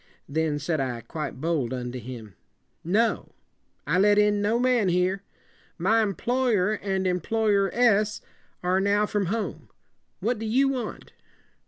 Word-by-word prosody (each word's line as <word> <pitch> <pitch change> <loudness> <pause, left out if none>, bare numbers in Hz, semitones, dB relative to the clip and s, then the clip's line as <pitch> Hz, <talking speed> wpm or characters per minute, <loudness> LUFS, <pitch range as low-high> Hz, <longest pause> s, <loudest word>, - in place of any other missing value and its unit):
Then 155 0 0
said 155 +2 -1
I, 125 -3 -2
quite 150 +1 -6
bold 155 -6 -1
unto 125 0 -5
him, 115 -4 -9 0.5
"No. 215 +7 0 0.5
I 180 - +1
let 205 +1 +5
in 210 0 +3
no 215 +3 +2
man 245 -5 +2
here. 180 +2 +1 0.6
My 215 +6 +3
em 200 -3 -1
ploy 245 -2 +1
er 190 +3 +1
and 190 -1 -1
employ 210 +5 +1
er 195 -1 +2
ess 215 -3 +2 0.4
are 180 +1 +2
now 200 +2 +2
from 205 -2 -1
home. 220 +3 -3 0.5
What 235 -1 -1
do 225 - -4
you 265 +5 +3
want?" 250 -5 -5
200 Hz, 155 wpm, -26 LUFS, 165-220 Hz, 0.6 s, let